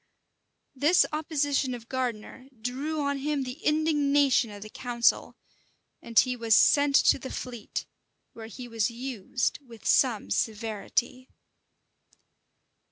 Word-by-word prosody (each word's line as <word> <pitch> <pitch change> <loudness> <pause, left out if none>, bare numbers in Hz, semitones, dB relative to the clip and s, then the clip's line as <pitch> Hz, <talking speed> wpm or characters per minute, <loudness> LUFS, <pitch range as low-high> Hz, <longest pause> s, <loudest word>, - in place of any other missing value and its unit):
[*] - - -51
This 345 +4 +6
opposition 290 -4 0
of 230 -1 -12
Gardiner 255 0 -4
drew 275 +7 -3
on 280 -1 -1
him 290 0 -1
the 255 +4 -8
indignation 290 -5 +2
of 205 -1 -9
the 215 - -10
council; 240 -2 0 0.7
and 230 -1 -7
he 255 -1 +5
was 230 -3 +2
sent 285 -1 +4
to - - +5
the 260 - -7
Fleet, 240 -4 -6 0.5
where 225 -1 -9
he 245 +3 -9
was 225 -2 0
used 245 -1 -3
with 235 -5 -15
some 240 -6 +2
severity. 225 +3 -2
255 Hz, 125 wpm, -27 LUFS, 230-280 Hz, 0.7 s, This